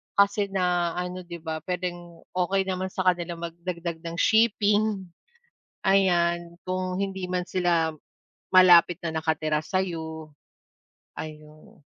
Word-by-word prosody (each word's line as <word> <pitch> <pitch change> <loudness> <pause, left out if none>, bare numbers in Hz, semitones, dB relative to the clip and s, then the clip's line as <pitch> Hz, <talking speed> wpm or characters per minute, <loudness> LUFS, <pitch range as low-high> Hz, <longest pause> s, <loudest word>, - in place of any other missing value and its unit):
kasi 200 0 +3
na 180 -3 0
ano, 180 +1 -4
'di 170 -2 -8
ba, 160 -1 -3
puwedeng 175 -2 -5
okey 185 +2 +1
naman 185 0 -2
sa 185 0 -3
kanilang 175 -2 0
magdagdag 170 0 -5
ng 165 0 -6
shipping, 210 0 +3 0.8
ayan, 175 -3 +2
kung 185 0 -2
hindi 190 -2 -3
man 180 -1 -1
sila 170 -4 +1 0.5
malapit 180 -2 +7
na 165 - -2
nakatira 155 -1 0
sa'yo. 160 -3 -3 0.9
Ayun. 155 -1 -10
175 Hz, 115 wpm, -26 LUFS, 170-185 Hz, 0.9 s, malapit